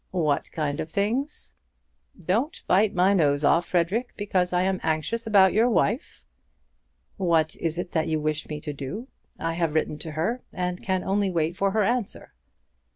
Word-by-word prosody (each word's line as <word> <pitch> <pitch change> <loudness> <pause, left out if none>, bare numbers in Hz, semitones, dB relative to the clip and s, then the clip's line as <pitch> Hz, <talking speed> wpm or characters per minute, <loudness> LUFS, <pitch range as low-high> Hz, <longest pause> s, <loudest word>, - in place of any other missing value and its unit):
"What 155 -6 0
kind 145 -3 -2
of 155 - -3
things?" 230 - -2 0.7
"Don't 215 - -1
bite 200 +2 +3
my 185 +3 +4
nose 145 -5 +2
off, 165 +4 +3
Frederic, 190 +8 0
because 185 -3 0
I 180 0 +2
am 190 0 0
anxious 160 +9 -1
about 195 -3 +5
your 225 +4 +4
wife." 235 +4 0 0.9
"What 165 -4 +2
is 165 0 -2
it 175 0 -4
that 160 -2 0
you 155 -1 0
wish 155 0 -2
me 150 -1 -4
to 150 - -5
do? 170 - -6 0.3
I 165 0 -2
have 165 -2 -1
written 155 -1 0
to 160 0 -4
her, 205 +11 -1
and 180 0 -3
can 190 -1 -1
only 200 0 +1
wait 165 -1 0
for 195 0 +1
her 215 +2 +1
answer." 235 0 -2
180 Hz, 175 wpm, -25 LUFS, 160-205 Hz, 0.9 s, about